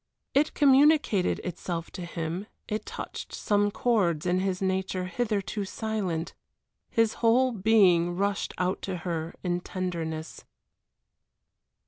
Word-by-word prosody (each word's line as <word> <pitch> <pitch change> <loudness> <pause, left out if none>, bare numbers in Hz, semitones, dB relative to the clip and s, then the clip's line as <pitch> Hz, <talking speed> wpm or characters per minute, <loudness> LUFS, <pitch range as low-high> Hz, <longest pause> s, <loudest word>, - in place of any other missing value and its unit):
It 295 +3 +2
communicated 285 - +4
itself 170 -1 -4
to 180 - -6
him, 170 +3 -4 0.2
it 215 0 -3
touched - - -6
some 205 0 +2
chords 195 -9 +1
in 180 +1 +2
his 185 -1 -1
nature 190 -1 -1
hitherto 205 -1 -2
silent. 195 -5 -3 0.6
His 225 -1 +2
whole 245 +3 +4
being 185 -5 +4
rushed 200 +1 -1
out 185 +1 0
to 190 -2 -3
her 165 -2 -3
in 175 -1 0
tenderness. 165 -4 -4
190 Hz, 115 wpm, -28 LUFS, 175-220 Hz, 0.6 s, communicated